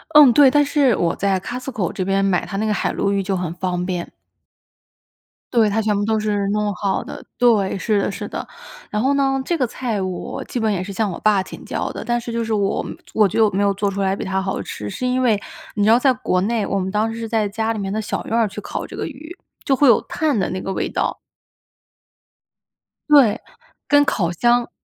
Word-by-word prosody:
嗯， 290 -5 +9
对， 280 +2 +7
但 290 +2 +3
是 280 -5 +3
我 170 -2 0
在 195 -1 0
Costco 245 -2 -4
这 185 - -2
边 195 +1 +1
买 185 -3 +1
它 195 - -5
那 215 - 0
个 215 - +1
海 - - -1
鲈 200 - 0
鱼 200 0 +1
就 195 0 -1
很 175 -2 -3
方 180 0 -2
便。 180 -2 -4 1.4
对， 230 -3 +4
它 215 +2 +1
全 215 -1 +1
部 205 - 0
都 220 0 +1
是 205 -2 -1
弄 210 0 0
好 195 0 -1
的 - - -9
对， 225 -5 +3
是 210 +1 +1
的 - - -1
是 - - -6
的。 - - -6 0.4
然 210 - 0
后 270 +3 +2
呢， 270 -1 +1
这 340 +5 -1
个 265 - +1
菜 235 -3 -3
我 185 -2 -4
基 245 - -4
本 220 -1 +1
也 185 -3 -1
是 200 +1 -7
向 210 0 0
我 170 - -6
爸 210 -2 +3
请 185 - -10
教 - - -3
的， - - -6
但 240 0 0
是 235 - -6
就 230 0 -1
是 225 0 -2
我 200 -2 0 0.3
我 215 -2 +5
觉 195 - -2
得 220 - +6
我 - - +2
没 200 0 0
有 200 -1 +2
做 200 +1 -1
出 200 0 -5
来 190 0 +1
比 - - -5
他 190 0 -1
好 190 0 -2
吃。 105 0 -6
是 255 - -3
因 255 +1 +1
为 220 -5 +2 0.3
你 205 - 0
知 210 - +4
道 230 - +7
在 260 +1 +3
国 240 -7 0
内， 220 +1 0
我 195 - 0
们 190 0 -2
当 215 +2 0
时 225 - -6
是 230 - -4
在 220 -2 0
家 220 +2 -1
里 220 - -5
面 195 -1 -3
的 215 - -1
小 215 - -3
院 230 - -1
儿 230 -2 +3
去 195 - -7
烤 - - -5
这 - - -10
个 - - -3
鱼， 310 +4 -10 0.3
就 270 - +3
会 285 +2 +4
有 235 - +6
炭 305 -6 -1
的 190 - +1
那 185 0 -3
个 195 - -4
味 - - -1
道。 - - -2 1.9
对， 275 -8 +5 0.5
跟 290 0 +5
烤 175 -10 0
箱 240 +6 +2
210 Hz, 275 characters per minute, -20 LUFS, 195-240 Hz, 1.9 s, 嗯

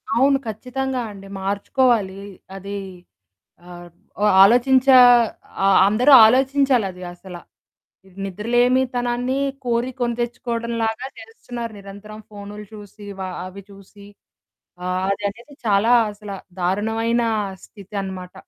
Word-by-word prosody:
అవును. 270 +3 +4
ఖచ్చితంగా 255 +4 -4
అండి. 195 -1 -12
మార్చుకోవాలీ. 200 0 0 0.4
అదీ 200 +1 -6 0.9
ఆహ్, 175 0 -11 0.5
ఆలోచించే 255 +5 +5 0.7
ఆహ్, 195 -1 +5
అందరూ 240 +7 +3
ఆలోచించాలది 255 -6 +1
అసల. 175 0 -11 0.9
నిద్రలేమితనాన్ని 245 +4 0 0.3
కోరి 240 +1 -1
కొనితెచ్చుకోవడంలాగా 235 -1 -3
చేస్తున్నారు 245 - -8
నిరంతరం 200 +2 -11
ఫోన్‌లు 205 0 -10
చూసి 205 -1 -12
వ - - -5 0.2
అవి 190 +2 -10
చూసి, 200 +1 -16 0.8
ఆహ్, 185 0 -1
అదనేది 205 +8 -5
చాలా 210 +3 +3 0.2
అసల 205 0 -10 0.3
దారుణమైన 225 +6 0 0.4
స్థితనమాట. 190 -3 -7
220 Hz, 90 wpm, -21 LUFS, 200-245 Hz, 0.9 s, ఆలోచించే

